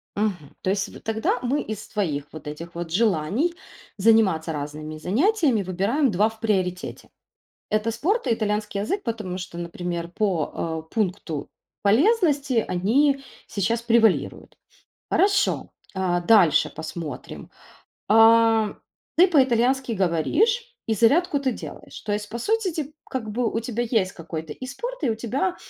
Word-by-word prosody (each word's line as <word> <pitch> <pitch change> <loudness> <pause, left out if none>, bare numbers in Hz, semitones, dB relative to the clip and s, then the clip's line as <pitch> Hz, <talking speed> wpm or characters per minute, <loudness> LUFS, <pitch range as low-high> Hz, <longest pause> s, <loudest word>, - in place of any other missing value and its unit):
Мгм, 195 -8 -2
то - - -1
есть 195 +1 -2
тогда 225 +2 0
мы 260 +4 0
из 215 -1 -6
твоих 160 -10 -2
вот 155 -2 -10
этих 165 +3 -7
вот 170 -1 -5
желаний 210 - +1 0.4
заниматься 195 -6 +3
разными 150 +1 -6
занятиями 265 - +2
выбираем 200 - +1
2 210 +4 +3
в 220 0 -16
приоритете. 185 -5 -2 0.6
Это 215 +2 +1
спорт 390 - 0
и - - +3
итальянский 210 -2 -2
язык, 390 - -2
потому 215 -7 -3
что, 180 -2 -7
например, 170 0 -4
по, 165 -4 -2
э, - - -22
пункту 180 -8 -2 0.3
полезности 280 - +3
они 270 +10 +2 0.2
сейчас 225 +4 -1
превалируют. 230 -3 +1 0.5
Хорошо, 400 +1 +2 0.2
э, 185 -2 0
дальше 180 -9 +5
посмотрим. 160 -3 -7 0.6
А 225 0 +5 0.4
ты 360 +3 +7
по-итальянски 260 -4 +3
говоришь, 375 - +1 0.2
и 220 - +2
зарядку 285 - +3
ты 265 -2 0
делаешь. - - -9
То 210 - -3
есть, 210 0 -2
по 235 - -5
сути, 415 - 0
те 310 -2 -4 0.2
как 230 -5 -3
бы 230 +1 0
у - - 0
тебя 235 0 -2
есть 220 -5 +1
какой-то 160 -2 -6
и 255 - -8
спорт, 480 - -6
и 265 - +2
у - - 0
тебя 265 - -1
220 Hz, 140 wpm, -24 LUFS, 180-260 Hz, 0.6 s, ты